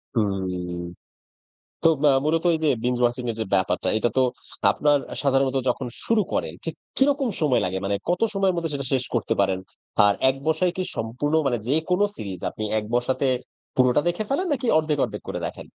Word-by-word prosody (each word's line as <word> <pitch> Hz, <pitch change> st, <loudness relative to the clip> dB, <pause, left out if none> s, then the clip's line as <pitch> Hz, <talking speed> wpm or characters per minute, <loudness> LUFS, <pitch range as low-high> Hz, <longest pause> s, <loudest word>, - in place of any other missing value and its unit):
হুম। 95 Hz, -4 st, -1 dB, 1.1 s
তো -, -, +6 dB, 0.2 s
আ -, -, +6 dB
মূলত 165 Hz, +2 st, +1 dB
এই -, -, 0 dB
যে -, -, +4 dB, 0.2 s
বিঞ্জ 125 Hz, 0 st, +1 dB
ওয়াচিং 120 Hz, +1 st, +1 dB
এর 115 Hz, -, -5 dB
যে -, -, 0 dB
ব্যাপারটা, 95 Hz, -1 st, +1 dB
এটা 120 Hz, -, +2 dB
তো 130 Hz, -, +5 dB, 0.5 s
আপনার 145 Hz, -1 st, +3 dB, 0.2 s
সাধারণত 135 Hz, -1 st, +2 dB
যখন 125 Hz, +1 st, -1 dB, 0.2 s
শুরু 225 Hz, -2 st, +3 dB
করেন, -, -, -1 dB
ঠিক -, -, -3 dB, 0.2 s
কিরকম 275 Hz, -1 st, +3 dB
সময় 145 Hz, -5 st, +3 dB
লাগে? 95 Hz, +1 st, -1 dB
মানে 100 Hz, +1 st, 0 dB
কত 175 Hz, +1 st, +1 dB
সময়ের 195 Hz, -2 st, +2 dB
মধ্যে 165 Hz, -2 st, -2 dB
সেটা 140 Hz, -1 st, -3 dB
শেষ 130 Hz, -1 st, +2 dB
করতে 120 Hz, -, +1 dB
পারেন? 95 Hz, -1 st, +2 dB, 0.5 s
আর, 100 Hz, -, +4 dB
এক 130 Hz, -, +1 dB
বসায় 165 Hz, +3 st, +2 dB
কি 185 Hz, -, -1 dB
সম্পূর্ণ 125 Hz, +7 st, -2 dB
মানে 120 Hz, -3 st, +1 dB
যেকোনো 180 Hz, +7 st, +2 dB
সিরিজ 95 Hz, -4 st, -6 dB
আপনি 110 Hz, -, -5 dB
এক 105 Hz, -, -3 dB
বসাতে 130 Hz, +3 st, +1 dB, 0.5 s
পুরোটা 125 Hz, +2 st, +4 dB
দেখে 175 Hz, +4 st, -1 dB
ফেলেন 330 Hz, +8 st, 0 dB
নাকি, 260 Hz, -3 st, -1 dB
অর্ধেক 155 Hz, -2 st, 0 dB
অর্ধেক -, -, -6 dB
করে -, -, -3 dB
দেখেন? -, -, -7 dB
135 Hz, 185 wpm, -24 LUFS, 110-165 Hz, 1.1 s, তো